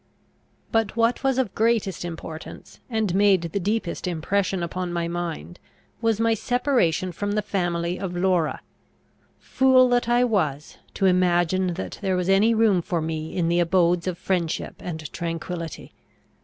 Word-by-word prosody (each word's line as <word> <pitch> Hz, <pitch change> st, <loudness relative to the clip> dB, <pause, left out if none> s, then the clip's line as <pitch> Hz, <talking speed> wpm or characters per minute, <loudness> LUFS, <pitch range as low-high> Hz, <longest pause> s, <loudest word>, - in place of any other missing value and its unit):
But 225 Hz, -2 st, +1 dB
what 230 Hz, +3 st, +1 dB
was 270 Hz, -1 st, +2 dB
of 245 Hz, -8 st, 0 dB
greatest 220 Hz, -6 st, +1 dB
importance, 165 Hz, -2 st, -8 dB
and 220 Hz, -6 st, 0 dB
made 195 Hz, -2 st, +4 dB
the 170 Hz, +4 st, -2 dB
deepest 200 Hz, -2 st, -2 dB
impression 185 Hz, +2 st, -1 dB
upon 180 Hz, +1 st, -3 dB
my 170 Hz, -1 st, -1 dB
mind, 170 Hz, -, -5 dB, 0.4 s
was 225 Hz, -2 st, +1 dB
my 230 Hz, 0 st, +3 dB
separation 225 Hz, -, +1 dB
from 205 Hz, +4 st, -3 dB
the 210 Hz, 0 st, 0 dB
family 175 Hz, -3 st, -1 dB
of 180 Hz, -2 st, -4 dB
Laura. 175 Hz, -3 st, +1 dB, 0.8 s
Fool 260 Hz, -1 st, +4 dB
that 245 Hz, -1 st, +1 dB
I 240 Hz, +1 st, +4 dB
was, 155 Hz, -, -1 dB, 0.2 s
to 195 Hz, -, 0 dB
imagine 180 Hz, 0 st, +2 dB
that 190 Hz, -, -6 dB
there 190 Hz, -2 st, 0 dB
was 180 Hz, +1 st, -1 dB
any 210 Hz, +4 st, +4 dB
room 215 Hz, -5 st, +3 dB
for 170 Hz, 0 st, -2 dB
me 160 Hz, +1 st, -4 dB
in 170 Hz, -2 st, +1 dB
the 170 Hz, +1 st, +2 dB
abodes 175 Hz, 0 st, +2 dB
of 180 Hz, -2 st, -2 dB
friendship 175 Hz, -4 st, -2 dB
and 160 Hz, -3 st, -6 dB
tranquillity! 165 Hz, -1 st, -5 dB
185 Hz, 155 wpm, -24 LUFS, 170-215 Hz, 0.8 s, made